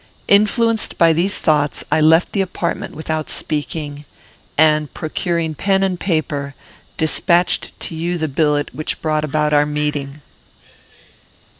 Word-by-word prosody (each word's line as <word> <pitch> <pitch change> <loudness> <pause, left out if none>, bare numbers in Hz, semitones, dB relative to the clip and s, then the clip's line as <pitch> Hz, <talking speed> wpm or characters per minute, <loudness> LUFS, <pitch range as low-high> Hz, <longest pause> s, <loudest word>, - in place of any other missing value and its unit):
Influenced 220 +2 +3
by 165 -1 +5
these 180 +5 +1
thoughts, 150 -2 +1
I - - +3
left 160 +3 +4
the 200 - +1
apartment 180 -2 -3
without 155 0 -3
speaking; 150 -1 -2 0.5
and, 155 -1 +3
procuring 165 0 -2
pen 195 +5 +1
and 185 -2 -1
paper, 145 -5 -2 0.4
despatched 170 +2 +1
to 165 - -4
you 170 +2 -2
the 160 -1 -1
billet 150 0 0
which 155 - -4
brought 155 -1 -1
about 150 0 0
our 145 0 +4
meeting. 150 -1 -3
155 Hz, 130 wpm, -18 LUFS, 150-175 Hz, 0.5 s, by